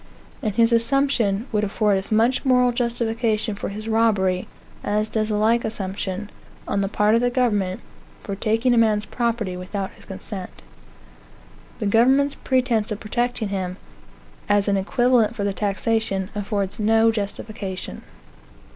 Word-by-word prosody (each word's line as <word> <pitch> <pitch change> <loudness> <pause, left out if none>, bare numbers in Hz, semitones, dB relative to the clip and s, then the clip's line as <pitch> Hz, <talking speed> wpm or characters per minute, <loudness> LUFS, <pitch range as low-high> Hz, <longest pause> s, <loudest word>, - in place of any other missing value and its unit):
And 215 -6 -2
his 230 0 +4
assumption 230 -4 +2
would 210 -2 +1
afford 210 0 +1
as 190 - -9
much 230 +4 +3
moral 250 -2 +4
justification 230 -2 -1
for 200 - -5
his 215 +2 -7
robbery 205 -5 +2 0.4
as 210 +1 0
does 215 -1 -1
a 210 - 0
like 225 +3 +2
assumption, 200 -1 -4 0.4
on 200 - 0
the 195 - 0
part 210 +1 +2
of 230 - +4
the 245 - +2
government, 210 -7 0 0.4
for 200 - -4
taking 225 +5 +1
a 235 - +4
man's 215 -2 +2
property 230 -6 -2
without 190 +2 -4
his - - -17
consent. 190 -1 -8 1.1
The 215 - -3
government's 265 +7 +4
pretence 245 -7 0
of 210 - -3
protecting 240 0 -1
him, 185 -2 -3 0.7
as 205 0 +3
an 200 - +2
equivalent 235 +3 +2
for 205 - -3
the 200 -1 0
taxation, 200 0 -1
affords 205 0 -3
no 225 +1 +4
justification. 205 -2 -5
215 Hz, 145 wpm, -23 LUFS, 200-235 Hz, 1.1 s, his